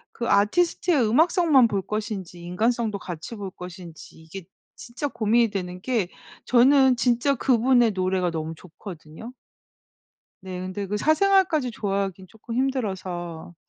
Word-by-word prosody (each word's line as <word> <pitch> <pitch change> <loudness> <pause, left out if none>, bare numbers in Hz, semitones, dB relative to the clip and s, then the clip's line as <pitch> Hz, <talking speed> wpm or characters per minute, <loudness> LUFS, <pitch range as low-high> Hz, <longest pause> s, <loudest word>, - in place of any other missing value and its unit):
그 235 - -3
아티스트의 280 - +2
음악성만 315 - +4
볼 200 -3 -1
것인지 205 -4 -5
인간성도 215 +3 -1
같이 175 +5 -7
볼 200 -2 -6
것인지 175 -3 -11
이게 165 +3 -10 0.3
진짜 245 +4 -5
고민이 230 -1 +2
되는 180 -2 -5
게 230 -7 0 0.4
저는 260 +1 +5
진짜 245 +4 +2
그분의 245 -2 +3
노래가 185 -1 0
너무 160 -1 -4
좋거든요. 175 +5 -11 1.1
네. 185 -1 -7
근데 185 +2 -5
그 210 +2 -2
사생활까지 315 - +2
좋아하긴 195 -3 -3
쪼끔 220 +2 -9
힘들어서. 190 -10 -3
210 Hz, 305 characters per minute, -24 LUFS, 185-250 Hz, 1.1 s, 저는